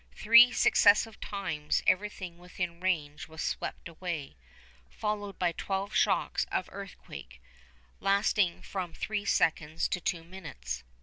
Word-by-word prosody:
Three 235 +3 +8
successive 210 0 +4
times 155 -7 -2
everything 185 -3 0
within 180 -1 -5
range 160 -5 -1
was 160 0 -6
swept - - -4
away, 170 - -5 0.5
followed 205 -2 -3
by 175 -2 +1
twelve 195 +4 -3
shocks - - +2
of - - -1
earthquake, 175 - -10 0.6
lasting 195 -2 +2
from 180 -4 -5
three 210 -1 -3
seconds 160 -3 +1
to 180 - -2
two 165 -1 -2
minutes. 155 - -7
180 Hz, 120 wpm, -30 LUFS, 160-200 Hz, 0.6 s, Three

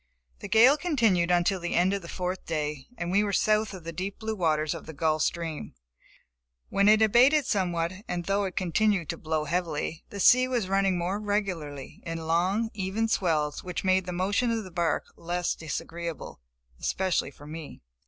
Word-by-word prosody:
* - - -40
The - - -5
gale 250 +7 +6
continued 225 - +2
until 180 +2 +2
the 175 0 -3
end 180 +3 +3
of 200 - -2
the 170 - -10
fourth 180 +1 -4
day, 150 -4 -3
and 175 -4 -3
we 200 +2 +3
were 205 - -1
south 215 +2 +2
of 185 -4 -9
the 165 +1 -6
deep 190 +4 -4
blue 220 0 -3
waters 155 -5 +1
of - - -9
the 160 - -7
Gulf 155 +1 +1
Stream, 165 -2 -3 0.9
when 200 +1 +3
it 215 +1 +6
abated 255 +7 +5
somewhat, 175 -4 0
and 175 -1 -3
though 200 +1 +1
it 185 - -5
continued 185 -1 +1
to 170 - -3
blow 155 -1 -1
heavily, 165 -1 -2
the 200 - -7
sea 255 +6 +6
was 240 -6 -1
running 195 -1 +2
more 180 +4 -1
regularly, 185 -10 -3
in 165 -1 -5
long, 185 +8 +1
even 205 +3 -1
swells 155 -8 0
which 180 -2 -4
made 185 -1 +2
the - - -2
motion 200 +7 0
of 225 -1 -1
the 185 - -10
bark 170 -2 0
less 175 +1 -1
disagreeable, 165 - -6 0.4
especially 185 -6 0
for 145 +1 -15
me. 155 - -9
180 Hz, 190 wpm, -27 LUFS, 165-205 Hz, 0.9 s, gale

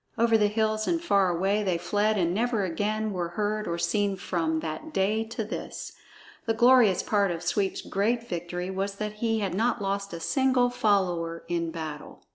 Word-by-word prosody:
Over 230 0 +3
the 210 -2 +4
hills 215 0 0
and 340 -1 +1
far 200 - +2
away 195 +4 +1
they 185 -4 0
fled 205 +5 +1
and 175 -2 +1
never 225 0 0
again 210 +4 -1
were 175 -2 -2
heard 210 +4 -2
or 170 - -2
seen 200 +4 0
from 165 -4 -1
that 165 - -5
day 210 0 +1
to 225 0 -4
this. 215 - -6 0.6
The 225 - +1
glorious 240 -4 +5
part 200 -2 +2
of 170 -1 -4
Sweep's 195 +2 0
great 230 +4 0
victory 175 +1 -4
was 195 +1 -2
that 210 +1 -4
he 225 -2 +1
had 195 -3 -1
not 230 +5 +1
lost 200 0 -2
a 170 - -6
single 255 - +2
follower 180 -7 0
in 170 -1 -1
battle! 160 -2 -7
200 Hz, 185 wpm, -27 LUFS, 175-220 Hz, 0.6 s, glorious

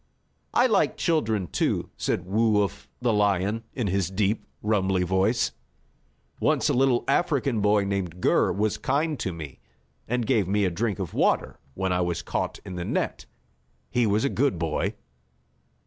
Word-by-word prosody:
"I 245 - +5
like 220 -6 +2
children, 110 - +1
too," 70 - -1
said - - -1
Woo 105 +2 +3
Uff, 70 -8 -6
the 120 -2 +3
lion, 105 +2 +1
in 125 - -1
his 95 -2 0
deep, 100 +2 -1 0.2
rumbly 95 -3 +1
voice. 95 +6 +1 0.9
"Once - - +2
a - - +2
little 130 -1 +3
African 140 -6 +1
boy 105 0 +3
named 95 -3 -3
Gur - - +3
was 105 +3 0
kind 150 +1 0
to 95 - -2
me, 80 -6 -8 0.5
and 125 0 0
gave 105 -4 +2
me 100 +1 +2
a 90 - +1
drink 105 +3 -1
of 95 -4 -5
water - - +1 0.2
when 95 -1 0
I 90 - +1
was 85 -2 -1
caught - - -2
in 90 - -6
the 90 - -3
net. - - -2 0.6
He 120 -2 +2
was 105 +3 +2
a - - +2
good 135 -9 +1
boy." 80 -2 -1
105 Hz, 165 wpm, -26 LUFS, 95-115 Hz, 0.9 s, I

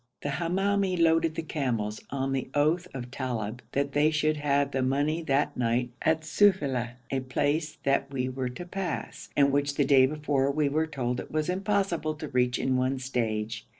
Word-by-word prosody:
The 145 - -1
Hamoumi 190 +4 0
loaded 165 -1 +3
the 165 - -3
camels, 120 -9 -2
on 135 0 -2
the 135 -1 -2
oath 160 +5 +2
of 125 -2 -7
Talib 120 -4 -3
that 140 0 0
they 145 +2 +3
should 155 0 +1
have 140 -1 +1
the 135 - 0
money 145 +5 +1
that 140 -2 +1
night 120 0 0
at 160 0 +2
Sufeila, 145 - +2 0.2
a 135 - +1
place 145 +4 -1
that 140 0 +1
we 130 -2 -1
were 130 0 -3
to 125 +8 -7
pass, 180 -2 -5
and 140 -1 +5
which 140 0 +1
the 145 - +2
day 130 -1 +6
before 145 -2 0
we 145 0 +1
were 155 +3 +1
told 125 -5 -2
it - - -7
was 155 +2 -1
impossible 190 -4 0
to 155 -1 -7
reach 125 -1 +1
in 130 -1 +1
one 130 +1 +1
stage. 115 -4 -2
140 Hz, 185 wpm, -28 LUFS, 130-155 Hz, 0.2 s, day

